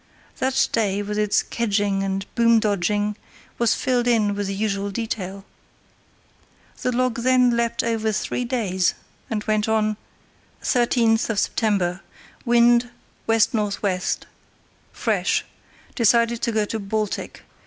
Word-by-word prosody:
That 265 0 +2
day, 205 -3 0
with 210 +1 -3
its 210 -1 +2
"kedging" 205 -3 0
and 195 0 -2
"boom 230 -1 +4
dodging", 205 0 0 0.4
was 235 -1 +3
filled 245 -2 0
in 215 -4 +2
with 205 -1 -3
the 195 - -3
usual 200 -1 -1
detail. 195 -2 -4 1.4
The 250 - 0
log 250 -1 0
then 250 0 +3
leapt 235 0 0
over 225 -1 0
three 215 +3 -2
days, 210 -8 0 0.3
and 215 -2 -2
went 215 0 0
on: 215 -1 +1 0.6
"Sept. 235 -2 +2
13. 200 -4 0 0.5
Wind 240 0 +4 0.4
W.N.W. 210 -4 +1 0.9
fresh. - - 0 0.5
Decided 235 0 +3
to 235 - 0
go 215 -1 +1
to 220 +2 -4
Baltic. 210 +1 -3
220 Hz, 120 wpm, -23 LUFS, 205-235 Hz, 1.4 s, boom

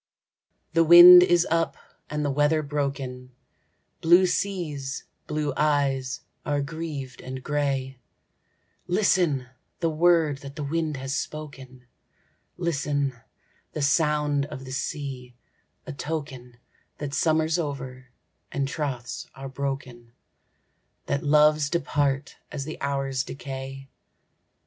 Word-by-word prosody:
The 165 0 +5
wind 175 +2 +11
is 175 -1 +4
up, 165 0 +1 0.3
and 150 0 -2
the 145 - 0
weather 150 +2 +2
broken, 135 -3 -4 0.7
Blue 175 +3 +6
seas, 165 -8 -2 0.2
blue 150 -2 -1
eyes, 140 -4 0 0.2
are 145 -1 0
grieved 145 -3 -5
and 130 0 -7
grey, 135 -3 -2 0.9
Listen, 175 -8 +2 0.3
the 165 -2 0
word 160 -3 +3
that 140 0 -10
the 150 - -4
wind 155 0 -2
has 135 +1 -3
spoken, 135 -4 -7 0.7
Listen, 145 -5 -1 0.6
the 155 - -2
sound 150 -1 +2
of 135 -2 -8
the 130 - -8
sea,—a 130 -2 -7
token 135 -4 -6 0.4
That 145 -2 -5
summer's 160 +2 +2
over, 130 -4 -5 0.4
and 140 -1 -1
troths 130 -5 -4
are 135 0 -7
broken,— 130 -4 -5 0.9
That 140 0 -1
loves 150 0 +4
depart 145 -4 -1
as 140 -2 -4
the 155 - -7
hours 135 -1 -1
decay. 135 0 -7
145 Hz, 110 wpm, -25 LUFS, 135-155 Hz, 0.9 s, wind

